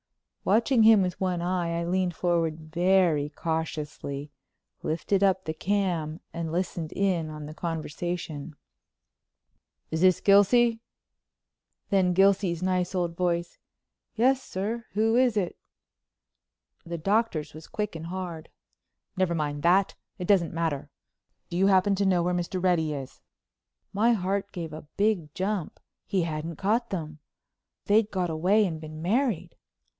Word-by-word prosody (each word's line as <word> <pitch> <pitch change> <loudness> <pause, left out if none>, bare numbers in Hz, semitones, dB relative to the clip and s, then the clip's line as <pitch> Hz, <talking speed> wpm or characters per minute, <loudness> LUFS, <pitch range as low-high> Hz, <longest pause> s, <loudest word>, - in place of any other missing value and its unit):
Watching 230 +4 +3
him 220 -2 +7
with 180 0 -3
one 180 -2 0
eye 175 -2 -1
I 170 - -2
leaned 180 0 0
forward 165 -3 0
very 175 -4 +3
cautiously, 150 -3 -4 0.5
lifted 170 +5 0
up 190 -1 +2
the 155 - -2
cam 175 -3 -1
and 165 -1 -4
listened 170 -2 -2
in 180 -5 0
on 150 -1 -7
the 150 - -8
conversation: 165 -1 -4 1.4
"Is 160 0 -1
this 185 -1 +5
Gilsey?" 225 +4 +5 1.1
Then 185 -2 +3
Gilsey's 190 -2 +3
nice 185 0 0
old 175 -2 -1
voice, 170 -1 -1 0.6
"Yes, 260 +4 +3
sir. 220 +2 -4
Who 220 +2 +2
is 245 -3 +3
it?" 185 -4 -1 1.3
The 170 0 -5
Doctor's 195 -4 0
was 155 0 -11
quick 210 -4 -3
and 165 0 -6
hard: 175 -3 -6 0.7
"Never 185 -2 +1
mind 145 -2 -2
that—it 180 +1 0
doesn't 185 -6 +3
matter. 160 -4 -2 0.6
Do 170 - -2
you 190 +2 +4
happen 195 +1 +4
to 200 +1 +1
know 180 -2 +3
where 180 +1 0
Mr. 180 +1 -2
Reddy 170 -4 +2
is?" 135 -3 -7 0.7
My 225 +4 +3
heart 195 0 -1
gave 165 -4 -6
a 155 -1 -9
big 200 -7 +1
jump—he 190 -1 -3
hadn't 160 0 -4
caught 225 +6 0
them! 155 -5 -5 0.7
They'd 210 +1 +3
got 180 -4 -1
away 190 +7 +3
and 160 -4 -4
been 155 0 -8
married! 225 - 0
180 Hz, 135 wpm, -27 LUFS, 160-200 Hz, 1.4 s, him